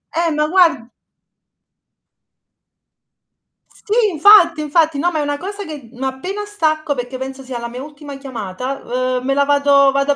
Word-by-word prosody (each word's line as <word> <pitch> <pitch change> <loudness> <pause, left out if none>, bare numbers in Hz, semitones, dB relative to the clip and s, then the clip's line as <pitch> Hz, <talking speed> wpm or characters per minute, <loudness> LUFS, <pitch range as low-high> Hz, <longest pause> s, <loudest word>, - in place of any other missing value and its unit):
Eh, 335 -1 +1
ma 300 0 0
guard 325 -9 +2 2.8
Sì, 420 - -6 0.2
infatti, 335 -1 +6
infatti. 310 0 +1
No, 350 +5 +1
ma 315 - -2
è - - 0
una 290 0 -2
cosa 400 +4 -6
che, 290 -9 -9
mhmm 250 - -16
n - - -4
appena 360 +11 -4
stacco, 310 -7 -1
perché 245 +1 -5
penso 265 0 -7
sia 255 -2 -6
la 235 - -5
mia 250 +2 -8
ultima 290 -1 -10
chiamata, 255 0 -6 0.4
uhm, 250 - -12
me 275 - +1
la 280 0 +3
vado 280 -1 +4
vado 275 +1 +1
a 285 - +1
285 Hz, 170 wpm, -18 LUFS, 265-325 Hz, 2.8 s, infatti